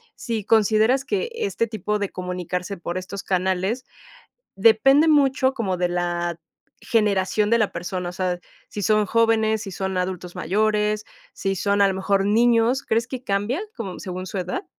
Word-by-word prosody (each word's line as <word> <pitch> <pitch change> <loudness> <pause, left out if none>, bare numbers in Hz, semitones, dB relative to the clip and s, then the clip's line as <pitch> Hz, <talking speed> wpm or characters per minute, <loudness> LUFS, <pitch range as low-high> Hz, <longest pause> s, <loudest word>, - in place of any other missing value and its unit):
si 225 -3 -3
consideras 220 +5 +3
que 420 +3 -1
este 410 - -1
tipo 210 -1 -2
de 200 - -2
comunicarse 180 +1 -4
por 175 0 -5
estos 190 +1 -6
canales 190 +6 -1 0.7
depende 230 +9 +5
mucho 270 -3 +3
como 200 -8 -2
de 180 0 0
la 175 -1 -2 0.4
generación 210 -1 +1
de 235 - +4
la 215 - +1
persona, 175 +1 -4
o - - -7
sea, 180 -1 -2 0.3
si 205 - -5
son 215 +1 +3
jóvenes, 220 0 +2
si 200 - -6
son 190 0 -3
adultos 180 -1 -3
mayores, 210 +2 0 0.3
si 195 0 -2
son 200 +2 +1
a 200 - +5
lo 195 - 0
mejor 195 +1 +1
niños, 235 +4 +3
¿crees 230 -1 0
que 255 -1 -6
cambian 205 - -1 0.2
como 195 -6 -5
según 185 -1 -5
su 190 +1 -4
edad? 185 - -4
205 Hz, 165 wpm, -23 LUFS, 185-230 Hz, 0.7 s, depende